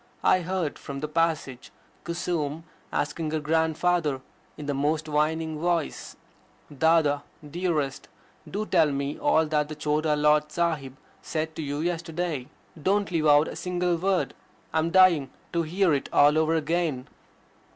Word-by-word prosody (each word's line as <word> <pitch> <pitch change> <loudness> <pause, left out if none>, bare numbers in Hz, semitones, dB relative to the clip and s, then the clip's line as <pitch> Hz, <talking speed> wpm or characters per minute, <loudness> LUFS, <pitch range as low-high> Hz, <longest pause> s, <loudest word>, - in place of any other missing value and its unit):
I - - +5
heard 180 -3 -2
from 140 -1 -6
the 150 - -3
passage 155 -5 -1 0.3
Kusum 165 -3 -2 0.3
asking 150 +2 -2
her 155 0 -1
grandfather 160 -1 +1 0.4
in 150 - -7
the 145 - -1
most 150 +3 0
winning 155 +1 0
voice: 170 -2 -2 0.6
"Dada, 155 -1 +3 0.3
dearest, 155 -4 -2 0.4
do 210 +2 -3
tell 165 -7 +3
me 140 +1 -3
all 160 0 +3
that 150 -1 0
the 155 - -5
Chota 150 0 0
Lord 150 0 +3
Sahib 150 -6 -1 0.2
said 160 0 -3
to - - -4
you 145 0 -3
yesterday. 165 -4 -2 0.3
Don't 200 +3 +1
leave 160 -3 +1
out 145 +1 +6
a - - -6
single 180 -1 -1
word. 185 +2 0 0.4
I 160 - +2
am 160 +1 +1
dying 170 -7 +5 0.2
to 170 - +2
hear 175 +1 +1
it 140 - -1
all 145 +1 +5
over 160 +1 +2
again." 160 -4 -1
155 Hz, 150 wpm, -26 LUFS, 150-170 Hz, 0.6 s, out